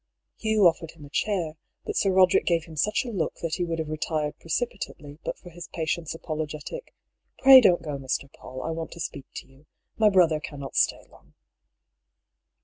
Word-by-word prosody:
Hugh 220 -1 +1
oflEered 165 -3 +3
him 150 -3 -12
a 145 - -15
chair, 175 -7 -1 0.3
but - - -4
Sir 195 - +2
Roderick 185 -1 +4
gave 170 -2 +2
him 160 -1 -12
such 210 - +1
a 240 - -4
look 180 -7 -2
that 165 -1 -1
he 180 - 0
would 165 -1 -2
have 160 -1 -3
retired 155 -1 -1
precipitately 160 -6 -4
but - - -3
for 175 - -13
his 170 0 -9
patient's 165 0 -2
apologetic 155 - -6
— - - -55
" - - -49
Pray 265 -1 +11
don't 175 -7 +4
go, 145 -3 -4
Mr. 135 +1 -2
PauU, 130 0 -9
I - - -1
want 165 0 -4
to 170 - -12
speak 145 -4 -5
to - - -7
you. 135 +3 -22 0.3
My 215 -1 +5
brother 175 -5 +4
cannot 140 -2 -8
stay - - +2
long." - - -22
165 Hz, 200 wpm, -26 LUFS, 155-185 Hz, 0.3 s, Pray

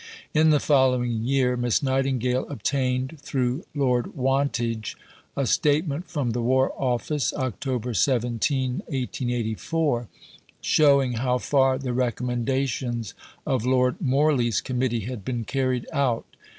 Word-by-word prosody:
In 155 +1 +4
the 150 -1 +4
following 125 -5 +2
year 130 -2 +2
Miss 120 +2 0
Nightingale 130 -2 0
obtained, 130 +2 -1
through 130 +3 -1
Lord 125 -4 0
Wantage, 125 -5 -1 0.4
a 140 - +1
statement 150 +5 +1
from 145 -7 -1
the 120 +1 -2
War 130 +3 +2
Office 130 +3 -1
(Oct. 125 -2 -3
17, 125 +2 +1
1884) 125 +1 -2 0.5
"showing 140 -4 +4
how 125 +2 0
far 135 0 +2
the 130 -2 -3
recommendations 125 -1 -1 0.3
of 130 -4 0
Lord 125 0 +2
Morley's 135 -5 +2
Committee 125 -2 -1
had 115 0 -6
been 120 +2 -3
carried 130 -2 -1
out." 135 -6 +1
130 Hz, 115 wpm, -25 LUFS, 120-135 Hz, 0.5 s, In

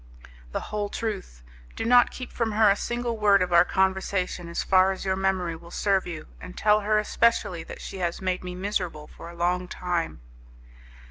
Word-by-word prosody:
"The - - -2
whole 205 -1 -1
truth. 195 - -5 0.3
Do - - -3
not 245 +1 +6
keep 255 - -8
from 225 -2 -1
her 215 -1 +5
a - - +3
single 240 +1 -3
word 200 -2 +5
of 180 -1 -3
our 170 - +8
conversation, 190 -2 -1
as 170 - -2
far 190 0 +4
as 190 - -6
your 190 0 +1
memory 190 -3 0
will 170 +1 -13
serve 195 +1 +1
you, 165 -3 -6 0.2
and 180 - -10
tell 210 0 +4
her 215 +1 +1
especially 210 -5 +1
that - - -9
she 195 - -7
has 175 -1 -2
made 185 -1 -2
me 180 0 -6
miserable 180 -5 -3
for 165 - -11
a 170 - -11
long 180 +1 0
time." 175 - -3
190 Hz, 195 wpm, -26 LUFS, 175-210 Hz, 0.3 s, our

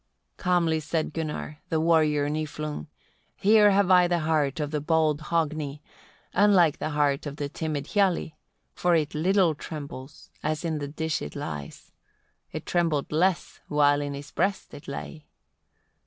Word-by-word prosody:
25. - - -14
Calmly 170 -3 +2
said 155 0 -2
Gunnar, 155 -1 -4
the 160 - +1
warrior 155 -3 +3
Niflung: 150 - -4 0.5
"Here 210 +1 +5
have 195 -1 +3
I 180 -1 +6
the 175 -1 0
heart 155 -2 +1
of 150 -1 -2
the 150 -1 -1
bold 155 -1 +2
Hogni, 155 -3 -2 0.5
unlike 185 -6 +4
the - - -2
heart 145 -1 +1
of 140 - -6
the 145 -1 -3
timid 150 -1 -3
Hialli; 190 -6 +1 0.4
for 175 -1 +2
it 155 -2 0
little 180 +2 +3
trembles, 145 -2 -9
as 155 +2 -2
in 160 -2 -1
the 145 - -4
dish 160 +2 -2
it 75 - -7
lies: 75 -3 -7 0.6
it - - -6
trembled 165 -5 0
less, 175 +3 0
while 145 -1 +3
in 145 -1 -3
his 140 +1 -9
breast 195 +2 -1
it 145 - -11
lay. 150 +2 -7
155 Hz, 155 wpm, -26 LUFS, 145-170 Hz, 0.6 s, I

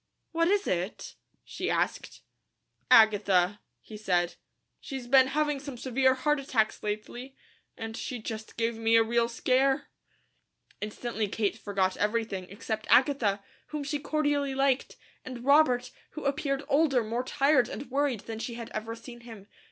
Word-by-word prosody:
"What 330 0 +2
is 405 +2 +2
it?" 180 +3 -3 0.3
she - - -4
asked. - - -2 0.7
"Agatha," 205 -3 +5 0.2
he 215 - -11
said. 180 -4 0 0.5
"She's 265 -3 -7
been 260 +1 +6
having 295 +1 0
some 275 -2 -8
severe 260 +1 +2
heart 295 +3 +1
attacks 230 -5 0
lately, 240 +5 -5 0.4
and 225 0 -6
she 250 - -4
just 220 -1 -7
gave 230 0 0
me 225 0 +3
a 225 - +6
real 235 +1 +1
scare." 265 +4 +1 0.9
Instantly 215 +1 -3
Kate 205 0 -1
forgot 195 -3 -1
everything, 210 -3 -1
except 220 +3 -5
Agatha, 235 -8 +3 0.2
whom 300 -1 -4
she 290 +1 -2
cordially 290 -2 0
liked, 270 -1 +1 0.3
and 250 -1 -8
Robert, 280 -3 +4 0.3
who 310 - -5
appeared 275 0 -1
older, 275 -4 +3
more 230 +3 -2
tired, 275 -1 +2
and 280 - -7
worried 275 -5 0
than 225 -1 -7
she 235 +1 -5
ever 225 -1 -5
had 230 - -16
seen 240 -2 -10
him. 225 -4 -11
240 Hz, 150 wpm, -28 LUFS, 220-275 Hz, 0.9 s, been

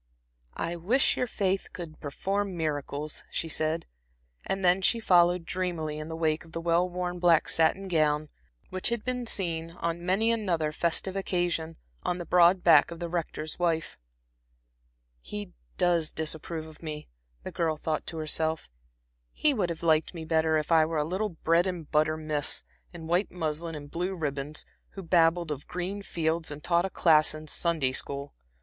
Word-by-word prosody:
"I 170 +1 -2
wish 225 +11 +3
your 250 - 0
faith 195 -3 -1
could 165 -3 -8
perform 195 +6 -2
miracles," 150 -1 -2
she 165 - -3
said. 155 +1 -1 0.6
And 195 -1 -2
then 180 +2 +4
she 230 +5 +3
followed 175 -4 +4
dreamily 165 -4 -2
in 155 - -6
the 160 - -5
wake 160 -1 0
of 165 - -17
the 165 - -3
well 170 +2 +2
worn 180 0 -3
black 170 -2 +4
satin 165 +4 +2
gown, 155 -3 +1 0.4
which 185 0 +1
had 235 -2 -2
been 250 -1 -2
seen, 165 -5 0
on 170 0 -3
many 195 +6 +2
another 175 -9 0
festive 170 +4 0
occasion, 175 -4 -1 0.3
on 180 - -1
the 175 - -5
broad 180 +2 +5
back 160 -4 +7
of 170 - -7
the 170 0 -4
Rector's 160 -2 -4
wife. 165 - 0 1.2
"He 205 - -6 0.3
does 170 -3 +2
disapprove 160 +1 -3
of 155 -1 -14
me," 155 -2 -6 0.4
the - - -5
girl 160 -2 0
thought 155 0 -2
to 165 - -4
herself. 160 - -1 0.6
"He 300 - +2
would 200 -8 0
have 170 0 -5
liked 160 +1 +2
me 160 -1 -6
better 160 0 +2
if 155 +2 -2
I 160 -1 +6
were 160 0 -1
a 150 - +1
little 190 +6 -1
bread 170 +1 +2
and 175 -5 -4
butter 155 +1 +2
miss, 155 -2 0 0.3
in 170 -2 -9
white 175 +5 +1
muslin 165 -1 -3
and 145 -1 -9
blue 180 +3 -2
ribbons, 145 -2 -3 0.3
who 195 - -7
babbled 165 -1 +3
of 145 -1 -5
green 185 +3 -4
fields 165 -3 -1
and 145 0 -8
taught 170 0 +2
a - - -2
class 155 -4 +4
in 155 0 -8
Sunday 155 -4 0
school. 140 +1 -4
165 Hz, 175 wpm, -28 LUFS, 155-180 Hz, 1.2 s, back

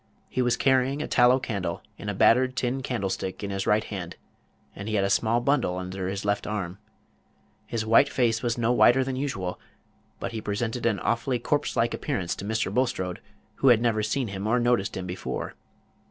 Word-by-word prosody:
He 130 - -1
was 120 -1 +2
carrying 135 +1 +2
a - - -4
tallow 120 +1 +5
candle 100 -7 -3
in 105 - -6
a 105 - -2
battered 130 +6 +4
tin 130 +1 -1
candlestick 100 -7 -3
in 100 - -3
his 95 0 -3
right 105 +1 +3
hand, 90 -5 -6 0.6
and 100 +2 -6
he 110 - -1
had 100 - +2
a 100 - +1
small 115 +3 +2
bundle 125 -9 +1
under 95 0 -4
his 95 +1 -4
left 100 0 0
arm. 100 -3 -4 0.9
His 115 -2 -2
white 115 +5 +5
face 115 -3 +1
was 120 -1 -1
no 115 0 +1
whiter 125 +1 +5
than 130 0 -3
usual, 100 -10 -3 0.6
but - - -4
he 110 -1 -4
presented 115 +3 -2
an 105 -4 +1
awfully 120 +2 0
corpse 145 +5 -1
like 115 +1 +1
appearance 105 - -2
to 100 - -6
Mr. 110 +1 -1
Bulstrode, 105 -8 -1 0.4
who 135 - +2
had 120 -3 +7
never 115 -2 +2
seen 110 +3 -1
him 100 +1 -4
or 120 +3 +3
noticed 120 -4 +1
him 95 - -4
before. 90 0 -4
115 Hz, 195 wpm, -26 LUFS, 100-125 Hz, 0.9 s, had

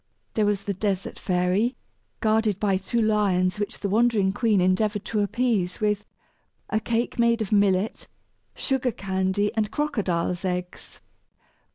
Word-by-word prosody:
There 215 -2 +2
was 200 -1 0
the 200 - -2
Desert 195 -1 -2
Fairy, 185 +6 +1 0.5
guarded 215 -2 +2
by 200 -3 +2
two 195 +5 -2
lions 205 -4 +2
which 205 - -4
the 200 - -1
wandering 215 -2 +2
queen 220 -2 +2
endeavored 200 +3 +1
to 215 - -1
appease 205 -3 0
with 210 -1 0 0.7
"a 215 - +2
cake 235 +2 -2
made 235 0 +3
of 205 - -8
millet, 200 0 +2 0.5
sugar 265 -2 0
candy, 190 +1 -1
and 215 -2 0
crocodile's 195 - -1
eggs." 180 -1 -4
205 Hz, 140 wpm, -25 LUFS, 190-220 Hz, 0.7 s, made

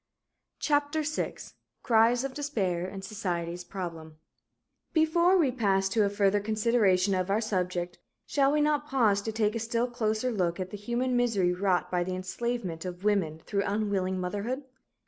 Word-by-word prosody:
CHAPTER 295 +1 +1
VI 305 +1 -2 0.5
CRIES 235 +2 +4
OF 275 -1 -3
DESPAIR 195 -12 -1
AND 190 0 -7
SOCIETY'S 175 -4 -3
PROBLEMS 165 -4 -6 0.8
Before 340 +3 +4
we 300 -7 +3
pass 195 -6 +1
to 215 +2 +2
a 200 - +2
further 200 0 +2
consideration 210 -3 +2
of 185 0 0
our 200 +2 +2
subject, 180 -4 -2 0.3
shall 275 -1 +2
we 300 0 +2
not 295 0 +1
pause 225 -8 +2
to 220 - -3
take 215 -1 +1
a 230 - -2
still 230 +1 0
closer 240 0 -1
look 180 -5 -1
at 185 0 -4
the - - -5
human 240 +4 -1
misery 215 -8 +2
wrought 185 -1 0
by 180 -1 +1
the 185 +1 -3
enslavement 185 -2 -3
of 180 0 -7
women 180 -7 0
through 200 -1 0
unwilling 200 -3 -1
motherhood? 205 +9 -3
205 Hz, 165 wpm, -28 LUFS, 185-245 Hz, 0.8 s, CRIES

